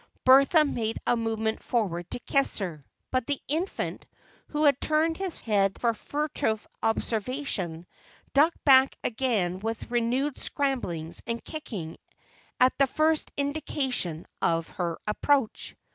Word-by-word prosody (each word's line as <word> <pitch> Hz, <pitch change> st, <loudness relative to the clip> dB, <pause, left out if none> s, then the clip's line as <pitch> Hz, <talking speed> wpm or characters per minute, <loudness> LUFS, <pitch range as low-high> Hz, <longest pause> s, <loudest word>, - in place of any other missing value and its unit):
Bertha 275 Hz, +4 st, +7 dB
made 225 Hz, -5 st, -2 dB
a -, -, +3 dB
movement 225 Hz, -1 st, -1 dB
forward 175 Hz, -8 st, -1 dB
to -, -, -3 dB
kiss 275 Hz, +3 st, +1 dB
her, 170 Hz, -8 st, -4 dB, 0.3 s
but 255 Hz, -2 st, 0 dB
the 285 Hz, -2 st, 0 dB
infant, 330 Hz, +7 st, -2 dB, 0.4 s
who 300 Hz, 0 st, -1 dB
had 280 Hz, -3 st, +4 dB
turned 315 Hz, +1 st, +2 dB
his 385 Hz, -3 st, -4 dB
head 200 Hz, -3 st, +1 dB
for 235 Hz, -1 st, +2 dB
furtive 285 Hz, -3 st, -2 dB
observation, 225 Hz, -, -2 dB, 0.5 s
ducked 305 Hz, +5 st, +3 dB
back 265 Hz, -1 st, +6 dB
again 215 Hz, -7 st, 0 dB
with 225 Hz, +3 st, -4 dB
renewed 250 Hz, +4 st, 0 dB
scramblings 185 Hz, -, -2 dB
and 230 Hz, 0 st, -3 dB
kicking 210 Hz, -, -6 dB, 0.6 s
at 255 Hz, +1 st, +5 dB
the 275 Hz, -, +5 dB
first 310 Hz, +3 st, +1 dB
indication 275 Hz, -, -1 dB, 0.2 s
of 165 Hz, -1 st, +1 dB
her 170 Hz, -2 st, -3 dB
approach. 255 Hz, +3 st, 0 dB
245 Hz, 130 wpm, -27 LUFS, 210-285 Hz, 0.6 s, Bertha